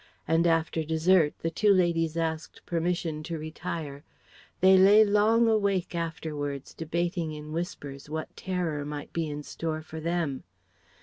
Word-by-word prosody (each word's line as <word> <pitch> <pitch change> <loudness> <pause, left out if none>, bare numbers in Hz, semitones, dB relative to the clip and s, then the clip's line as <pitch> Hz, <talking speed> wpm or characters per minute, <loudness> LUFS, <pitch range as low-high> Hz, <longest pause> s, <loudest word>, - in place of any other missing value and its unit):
And 165 +2 +3
after 165 -1 +1
dessert 160 0 +3
the 165 - 0
two 210 +5 +3
ladies 170 -4 +2
asked 160 -1 -3
permission 170 -2 -1
to 165 +1 -5
retire. 155 -2 -6 0.6
They 190 +1 +7
lay 200 +3 +7
long 215 +3 +4
awake 200 -5 +1
afterwards, 150 -4 -4
debating 170 0 -2
in 150 0 -8
whispers 150 -5 -5
what 155 +1 -5
terror 175 -6 -2
might 145 0 -6
be 165 -2 -1
in 150 0 -5
store 155 +1 -4
for 160 0 -8
them. 165 -4 -2
165 Hz, 140 wpm, -28 LUFS, 155-180 Hz, 0.6 s, They